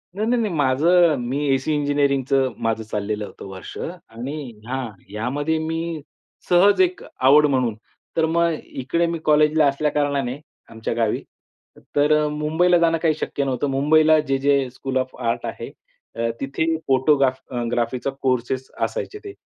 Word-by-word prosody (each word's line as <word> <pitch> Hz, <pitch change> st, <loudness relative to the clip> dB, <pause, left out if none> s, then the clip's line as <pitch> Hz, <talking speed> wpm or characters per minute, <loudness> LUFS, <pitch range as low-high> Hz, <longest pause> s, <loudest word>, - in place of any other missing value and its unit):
नाही, 215 Hz, +2 st, -1 dB
नाही, 240 Hz, 0 st, +2 dB
नाही. 210 Hz, -6 st, -1 dB
माझं 155 Hz, +4 st, +4 dB
मी 130 Hz, +4 st, -2 dB
एसी 135 Hz, +4 st, 0 dB
इंजिनिअरिंगचं 140 Hz, -2 st, +1 dB
माझं 115 Hz, -1 st, 0 dB
चाललेलं 105 Hz, 0 st, -3 dB
होतं -, -, -11 dB
वर्ष 95 Hz, -1 st, -9 dB
आणि 135 Hz, -6 st, -7 dB, 0.3 s
हां, 130 Hz, -1 st, -3 dB, 0.2 s
ह्यामध्ये 140 Hz, +9 st, -1 dB
मी 165 Hz, -1 st, -3 dB, 0.5 s
सहज 195 Hz, -, +5 dB
एक 370 Hz, +5 st, +1 dB, 0.2 s
आवड 150 Hz, +2 st, +7 dB
म्हणून. 130 Hz, -6 st, +1 dB, 0.4 s
तर 160 Hz, -, +4 dB
मग 170 Hz, +1 st, +2 dB
इकडे 150 Hz, +6 st, -1 dB
मी 165 Hz, 0 st, -3 dB
कॉलेजला 150 Hz, 0 st, +4 dB
असल्या 145 Hz, +2 st, 0 dB
कारणाने 140 Hz, -3 st, -1 dB, 0.3 s
आमच्या 115 Hz, 0 st, -4 dB
गावी, 115 Hz, -2 st, 0 dB, 0.7 s
तर 145 Hz, +1 st, +3 dB
अ, -, -, +1 dB
मुंबईला 160 Hz, +4 st, +2 dB
जाणं 165 Hz, -1 st, +3 dB
काही 160 Hz, -2 st, +4 dB
शक्य 140 Hz, -, -2 dB
नव्हतं. 135 Hz, +2 st, -1 dB
मुंबईला 155 Hz, +3 st, +4 dB
जे 135 Hz, -3 st, 0 dB
जे 140 Hz, -1 st, +2 dB
स्कूल 130 Hz, 0 st, -3 dB
ऑफ 130 Hz, 0 st, -2 dB
आर्ट 115 Hz, -2 st, -1 dB
आहे. -, -, -6 dB, 0.7 s
तिथे 140 Hz, +4 st, -2 dB, 0.2 s
फोटोग्राफ 135 Hz, 0 st, +3 dB, 0.3 s
ग्राफीचा 120 Hz, +2 st, -1 dB
कोर्सेस 130 Hz, 0 st, -1 dB
असायचे 455 Hz, -4 st, -3 dB
ते. 400 Hz, -, -7 dB
140 Hz, 150 wpm, -22 LUFS, 130-160 Hz, 0.7 s, आवड